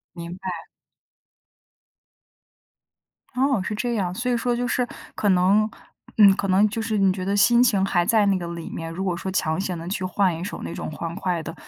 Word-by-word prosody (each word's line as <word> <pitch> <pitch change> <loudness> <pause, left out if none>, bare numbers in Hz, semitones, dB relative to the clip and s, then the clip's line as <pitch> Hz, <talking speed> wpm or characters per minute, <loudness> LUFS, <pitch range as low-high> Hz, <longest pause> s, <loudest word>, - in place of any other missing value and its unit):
明 170 0 -7
白。 185 -3 -6 2.7
哦， 260 -5 +1
是 210 - -3
这 240 +3 -2
样。 185 -5 -1
所 250 +5 -2
以 240 - +2
说 240 +1 0
就 245 +1 -1
是 250 -1 0 0.3
可 205 - +1
能 195 +4 +3 0.5
嗯， 200 -2 +8
可 195 - -2
能 200 +3 +4
就 225 +2 -3
是 220 -1 -1
你 195 -1 +4
觉 185 -1 -5
得 200 - 0
心 240 +4 +5
情 205 -6 +3
还 175 -3 +1
在 215 +1 +3
那 195 -1 +3
个 175 - -5
里 170 -1 -6
面， 165 0 -6
如 185 - -4
果 180 -3 -1
说 190 +2 -4
强 160 -3 0
行 185 -3 -3
地 165 - -7
去 185 0 -3
换 185 -2 +1
一 170 - -5
首 200 - -6
那 85 0 -5
种 - - -5
欢 165 +2 -5
快 180 -3 -2
的， - - -7
190 Hz, 225 characters per minute, -23 LUFS, 175-215 Hz, 2.7 s, 嗯